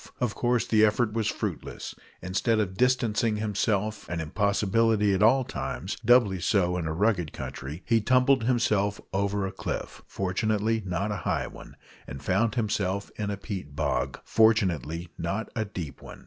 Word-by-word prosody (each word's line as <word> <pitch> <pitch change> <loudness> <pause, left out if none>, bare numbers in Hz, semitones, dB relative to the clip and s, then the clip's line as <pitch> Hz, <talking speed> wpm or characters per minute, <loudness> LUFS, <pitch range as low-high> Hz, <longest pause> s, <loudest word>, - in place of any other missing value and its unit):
Of 120 -4 0
course 120 -1 +1
the 110 -1 +3
effort 110 +1 +2
was 110 -2 0
fruitless. - - -4 0.3
Instead 95 +5 +1
of 95 -3 -1
distancing 115 -2 +2
himself 105 0 -1
an 85 -1 -2
impossibility 105 +4 +2
at 95 - 0
all 130 +5 +5
times 90 - -4
doubly 115 -5 +4
so 90 -1 +2
in 85 -3 -2
a - - -2
rugged 85 -2 +1
country 75 +7 -7
he 115 -1 +3
tumbled 130 +1 +3
himself 110 -5 +1
over 100 0 0
a 95 - -3
cliff, 95 - -5
(fortunately 110 +4 0
not 95 +4 -1
a 105 - -2
high 85 - -1
one), - - -11 0.3
and 70 +1 -8
found 105 - +1
himself 100 -4 -1
in 105 -1 -2
a 100 - -3
peat 95 -8 -6
bog, - - -1
(fortunately 90 - +2
not 95 +7 -2
a 110 -2 0
deep 85 -8 -7
one). - - -11
105 Hz, 160 wpm, -27 LUFS, 95-110 Hz, 0.3 s, all